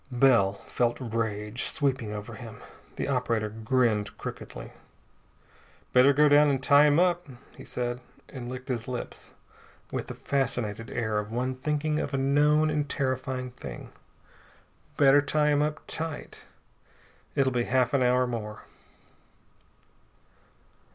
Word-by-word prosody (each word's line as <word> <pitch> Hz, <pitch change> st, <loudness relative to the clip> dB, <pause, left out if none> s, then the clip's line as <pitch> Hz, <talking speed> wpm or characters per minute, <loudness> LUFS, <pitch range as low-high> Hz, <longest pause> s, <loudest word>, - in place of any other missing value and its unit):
Bell 120 Hz, -6 st, +4 dB
felt 120 Hz, -1 st, 0 dB
rage 110 Hz, -2 st, -3 dB
sweeping 130 Hz, -7 st, 0 dB
over 105 Hz, +2 st, -6 dB
him. 110 Hz, -2 st, -10 dB, 0.3 s
The -, -, -3 dB
operator 115 Hz, -5 st, 0 dB
grinned 110 Hz, -1 st, 0 dB
crookedly. -, -, -8 dB, 1.2 s
"Better 130 Hz, +2 st, +7 dB
go 150 Hz, +2 st, +5 dB
down 145 Hz, 0 st, +6 dB
and 135 Hz, -1 st, 0 dB
tie 145 Hz, +1 st, +6 dB
him 145 Hz, 0 st, +4 dB
up," 175 Hz, -1 st, +2 dB, 0.3 s
he -, -, -11 dB
said, 120 Hz, 0 st, -3 dB, 0.3 s
and 125 Hz, -3 st, -7 dB
licked 130 Hz, 0 st, -7 dB
his 120 Hz, -3 st, -3 dB
lips 125 Hz, -1 st, -6 dB, 0.6 s
with -, -, -3 dB
the -, -, -6 dB
fascinated 115 Hz, -5 st, -2 dB
air 110 Hz, -3 st, -1 dB
of 105 Hz, 0 st, -5 dB
one 125 Hz, +2 st, -1 dB
thinking 150 Hz, +3 st, -1 dB
of 140 Hz, -, -2 dB
a -, -, +1 dB
known 150 Hz, +3 st, +3 dB
and 150 Hz, -1 st, -1 dB
terrifying 130 Hz, -2 st, -2 dB
thing. 70 Hz, -, -9 dB, 1.1 s
"Better 140 Hz, 0 st, +6 dB
tie 150 Hz, +1 st, +1 dB
him 145 Hz, 0 st, +3 dB
up 150 Hz, +1 st, -2 dB
tight. 160 Hz, -2 st, -6 dB, 0.9 s
It'll 135 Hz, -1 st, +2 dB
be 120 Hz, -1 st, 0 dB
half 125 Hz, -1 st, +1 dB
an 140 Hz, -, +3 dB
hour 125 Hz, 0 st, +3 dB
more." 110 Hz, -3 st, -5 dB
130 Hz, 135 wpm, -27 LUFS, 115-145 Hz, 1.2 s, Better